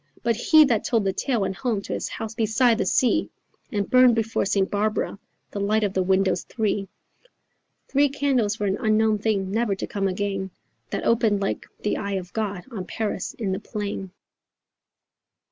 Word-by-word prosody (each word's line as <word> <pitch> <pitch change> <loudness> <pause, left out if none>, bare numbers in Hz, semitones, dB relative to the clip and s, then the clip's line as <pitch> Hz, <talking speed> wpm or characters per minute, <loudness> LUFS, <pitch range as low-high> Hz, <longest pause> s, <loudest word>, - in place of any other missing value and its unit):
But 235 -1 +2
he 310 +7 +6
that 235 -6 +1
told 230 -3 +1
the 195 -1 0
tale 240 +2 -1
went 190 0 -2
home 235 -5 -1
to - - -5
his - - -3
house 225 -1 -5
beside 225 +1 +2
the - - 0
sea 260 +5 +2 0.4
And 205 -2 -1
burned 255 -2 +6
before 225 -2 0
St. 195 0 +2
Barbara, 210 -1 -1 0.3
the 205 - -4
light 215 +2 +1
of 200 -2 0
the 190 - +1
windows 190 0 +2
three, 205 -3 -2 1.0
Three 285 +1 +3
candles 265 -7 +1
for 210 - -3
an 195 0 0
unknown 215 -2 +2
thing, 200 -3 0
never 220 -1 +1
to - - -4
come 195 -1 -1
again, 195 0 -2 0.4
That - - -3
opened 220 -3 +2
like 195 - -3
the 210 - 0
eye 200 -1 -3
of 185 -1 -4
God 205 -5 -2
on 195 -6 -5
Paris 215 -4 -3
in 210 -5 -2
the 190 - -1
plain. 205 -3 -5
210 Hz, 180 wpm, -24 LUFS, 195-230 Hz, 1.0 s, he